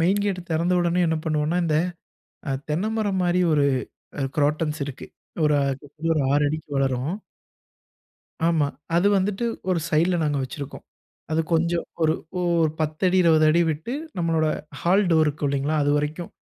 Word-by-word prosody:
Main 190 +5 +3
gate 195 -3 -1
திறந்த 170 +3 +1
உடனே 175 +1 +1
என்ன 160 0 +1
பண்ணுவோம்ன்னா, 155 +2 0
இந்த 155 -2 +1 0.7
அ - - 0 0.2
தென்ன 170 +8 0
மரம் 200 -3 0
மாரி 175 +1 +2
ஒரு 145 -1 +3 0.6
அ - - 0
குரோட்டன்ஸ் 150 +1 +1
இருக்கு. 135 - -8 0.4
ஒரு 150 - +3
அ - - +1 0.2
சுத்தி 150 +3 -5
ஒரு 150 - +2
6 145 +1 +3
அடிக்கு 155 0 -5
வளரும். 135 +4 0 1.4
ஆமா. 155 -4 +2 0.3
அது 175 +4 +3
வந்துட்டு 200 +4 -1 0.3
ஒரு 175 - +2
சைடுல 170 +3 +2
நாங்க 145 -2 0
வச்சிருக்கோம். 135 +2 -7 0.5
அது 160 +1 +2
கொஞ்சம் 170 +1 +1 0.2
ஒரு 155 0 +4 0.3
ஓரு 170 -3 +2
10 155 +3 -2
அடி, 185 - +2
20 160 -2 +5
அடி 170 +2 +4
விட்டு, 160 - -4 0.3
நம்மளோட 165 -2 +1 0.3
ஹால் 190 +4 +3
டோர் 160 -1 +5
இருக்கும் 145 -1 -1
இல்லைங்களா, 140 +3 0
அது 145 - +2
வரைக்கும். 155 +4 -4
160 Hz, 165 wpm, -24 LUFS, 150-175 Hz, 1.4 s, 20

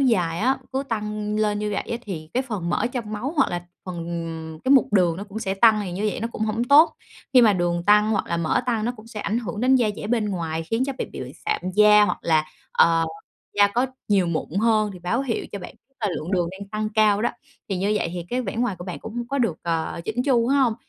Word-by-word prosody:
dài 180 -11 +2
á, 260 +6 +2
cứ 265 +1 0
tăng 210 -1 -2
lên 210 -1 +1
như 210 0 -2
vậy 200 - -1
á 235 - 0
thì 160 -8 -7
cái 255 - +2
phần 205 -10 -4
mỡ 235 - +1
trong 225 -4 -4
máu 245 +8 -3
hoặc 270 - +3
là 175 0 -3 0.2
phần, 180 -2 -6
ừm 165 -2 -5
cái 260 - +1
mục 265 -5 +4
đường 180 -5 +3
nó 200 - -6
cũng 210 +1 -7
sẽ 195 -4 -2
tăng, 215 +1 +5
thì 185 - -5
như 200 +4 -1
vậy - - -5
nó 230 - -2
cũng - - -4
hổng 220 +2 0
tốt. 290 +6 +6 0.4
Khi 250 - +7
mà 220 -3 +6
đường 175 -2 0
tăng 210 +1 +5
hoặc 205 - 0
là 170 - -1
mỡ 170 +5 +1
tăng 225 -3 0
nó 240 - 0
cũng 215 +1 -13
sẽ 215 -3 -6
ảnh 220 +3 -1
hưởng 210 -3 -5
đến 260 +1 +5
da 240 -4 +2
dẻ - - -5
bên 225 -2 0
ngoài 165 -3 -2
khiến 225 +9 -1
cho 275 - -2
bạn - - -3
bị - - -7
bệnh - - -7
sạm 435 0 0
da 210 0 +7
hoặc - - -1
là, 155 -2 +2 0.3
ờ, 165 0 +4 0.5
da 205 - +7
có 245 +6 +1 0.2
nhiều 195 -3 +3
mụn 170 -2 -2
hơn, 215 -2 +3
thì 180 - -10
báo 180 +9 -1
hiệu 245 -4 -2
cho 200 - -4
bạn 180 - -9 0.3
là 210 - +1
lượng 160 - -5
đường 175 -2 +1
đang 195 +1 -9
tăng 215 +1 -2
cao 215 -1 +3
đó, - - +2 0.4
thì 195 - -1
như 195 +3 0
vậy 170 - -1
thì 175 -2 -5
cái 250 +1 0
vẻ 230 - -5
ngoài 240 -4 0
của 175 - -7
bạn 180 - -6
cũng 220 - -9
hông 240 0 -3
có 280 - -1
được, 225 -11 +1
ờ, 165 -1 -2
chỉn 230 +5 -1
chu 245 -4 +2
phải 280 - +3
hông? 250 -5 +3
210 Hz, 275 wpm, -23 LUFS, 180-235 Hz, 0.5 s, Khi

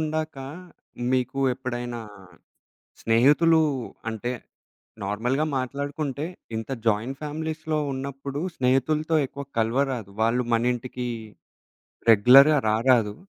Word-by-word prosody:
ఉండాక 155 -1 -2 0.8
మీకు 130 +1 0 0.2
ఎప్పుడైనా 120 -2 -5 1.0
స్నేహితులు 145 +8 +4 0.5
అంటే 115 +3 -3 0.7
నార్మల్‌గా 120 +9 0
మాట్లాడుకుంటే 140 +2 -3 0.3
ఇంత 115 +4 -5 0.2
జాయింట్ 115 +5 0
ఫ్యామిలీస్‌లో 155 +1 -3
ఉన్నప్పుడు, 135 +1 -5 0.2
స్నేహితులతో 150 +5 +1
ఎక్కువ 140 +2 -8
కల్వరాదు. 120 -2 0
వాళ్ళు 120 +2 +2
మనింటికి 125 +1 -1 1.0
రెగ్యులర్‌గా 135 +8 +7
రా 110 - +3
రాదు. 110 -4 +3
130 Hz, 85 wpm, -25 LUFS, 120-145 Hz, 1.0 s, రెగ్యులర్‌గా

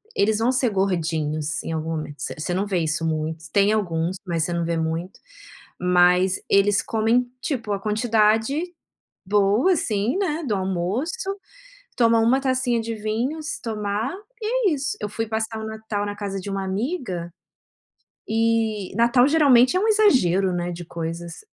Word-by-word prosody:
eles 215 +1 +2
vão 240 +3 +2
ser 255 -1 +2
gordinhos 165 -6 -1
em - - -4
algum 160 0 -3
momento". 155 -2 -5
V - - -6
você 175 +3 -2
não 195 +3 0
vê 185 -3 0
isso 160 0 -1
muito, 160 0 -2
tem 200 +1 +3
alguns 180 -4 -1
mas 170 -3 -1
você 175 - -1
não 170 -1 -1
vê 170 0 -1
muito. 165 +3 -3 0.6
Mas 180 +1 +3
eles 200 0 +4
comem, 225 +3 +1
tipo, 235 -7 -3
a 195 - -2
quantidade 220 - +2 0.6
boa, 210 - +3
assim, 220 - 0
né, 330 -4 -1
do 215 - 0
almoço. 205 - -2 0.6
Toma 230 -1 +4
1 235 +4 +3
tacinha 255 -3 +1
de 230 0 -4
vinho, 225 +9 -2
se 315 - -4
tomar, 215 +2 -2 0.3
e 455 0 +1
é 320 - +1
isso. 285 +2 -2
Eu 210 - -3
fui 225 +2 -3
passar 220 0 -2
o 220 - -5
Natal 220 -1 -4
na 205 0 -4
casa 200 -2 -4
de 190 - -7
uma 195 0 -2
amiga, 190 - -3 1.0
e 225 -3 0
Natal 240 +2 +4
geralmente 285 -1 +5
é - - +3
um 435 - +1
exagero, 225 - +3
né, 175 0 -2
de 175 0 -7
coisas. 170 - -6
210 Hz, 165 wpm, -23 LUFS, 180-240 Hz, 1.0 s, geralmente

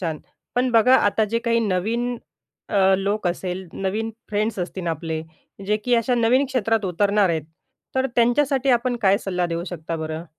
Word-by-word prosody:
छान. 165 -4 -3 0.4
पण 250 +1 +1
बघा 235 +3 +5
आता, 210 +2 +2
जे 230 +2 -1
काही 230 0 +1
नवीन 225 +5 -1 0.5
अ, 195 -2 +4
लोक 200 +1 -1
असेल, 180 +1 -4
नवीन 210 +4 -2 0.2
फ्रेंड्स 215 0 -1
असतील 180 0 -4
आपले, 160 0 -3 0.4
जे 210 +1 +2
की 245 -1 +3
अशा 235 +2 +2
नवीन 245 +4 +3
क्षेत्रात 225 -5 0
उतरणार 200 +2 +2
आहेत, 160 -2 -1 0.5
तर 260 0 +2
त्यांच्यासाठी 265 +3 +2
आपण 245 0 +2
काय 195 0 +4
सल्ला 180 -4 -1
देऊ 170 0 -3
शकता 165 -1 -5
बरं? 160 +1 -5
205 Hz, 170 wpm, -22 LUFS, 180-235 Hz, 0.5 s, बघा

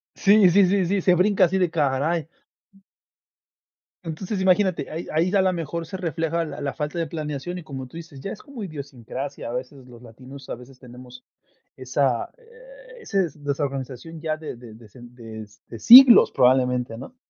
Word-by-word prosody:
Sí, 200 -2 +5
sí, 200 +2 +5
sí, 190 -1 +1
sí, 195 +2 0
se 180 0 +3
brinca 190 +1 +3
así 190 +3 -1
de 180 -3 +1
¡Caray! 150 +1 -1 1.8
Entonces, 185 +5 -4
imagínate, 190 -1 +1
ahí 165 +2 -6
ahí 165 +4 +1
ya 200 - +2
a - - +5
lo 185 -1 +1
mejor 165 0 -5
se 175 - -8
refleja 165 -1 -2
la 160 - -7
la 140 -1 -3
falta 155 +3 -4
de 165 - -2
planeación 155 +1 -5
y, 175 - -8
como 135 -4 -8
tú 145 - -17
dices, 160 -5 -10
ya 195 - -6
es - - -12
como 275 -6 -11
idiosincrasia, 140 - -7
a - - -6
veces 130 +1 -7
los 120 -1 -15
latinos, 130 +3 -13
a - - -4
veces 125 +2 -15
tenemos 125 0 -14 0.5
esa, 130 -1 -1
eh, - - -17
ese 195 - -1
desorganización 140 +1 -5
ya 155 -1 -2
de 155 -4 -8
de 120 -3 -13
de 115 -1 -12 0.2
de 115 - -9
siglos 250 - +9
probablemente, 125 -2 +2
¿no? 135 - -11
155 Hz, 175 wpm, -23 LUFS, 130-185 Hz, 1.8 s, siglos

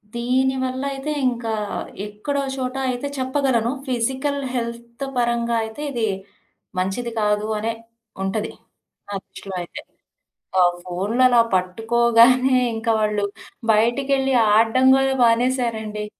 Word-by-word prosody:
దీనివల్లయితే 260 +3 -1 0.2
ఇంకా 235 -2 -3 0.5
ఎక్కడో 210 +8 -3
ఓ - - -3
చోట 255 0 -3
అయితే 250 +3 -2
చెప్పగలను, 260 -3 +1 0.2
ఫిజికల్ 265 +3 -1
హెల్త్ 235 +1 -4
పరంగా 235 -1 +1
అయితే 220 +6 -7
ఇది 235 -4 0 0.7
మంచిది 195 +6 -1
కాదు 210 0 +1
అనే 225 +2 -1 0.5
ఉంటది. 210 +3 -2 0.6
నా 205 - -7
దృష్టిలో 195 -1 -9
అయితే. 175 - -8 0.8
ఆ - - +7 0.2
ఫోన్లలా 230 +8 +3
పట్టుకోగానే 235 +6 +4 0.2
ఇంకా 225 +1 0
వాళ్ళు 210 -1 +1 0.5
బయటికెళ్ళి 270 +5 +2 0.2
ఆడ్డం 230 +4 +3
గూడా 270 0 +2
మానేశారండి. 230 -3 +1
235 Hz, 105 wpm, -22 LUFS, 220-260 Hz, 0.8 s, ఆ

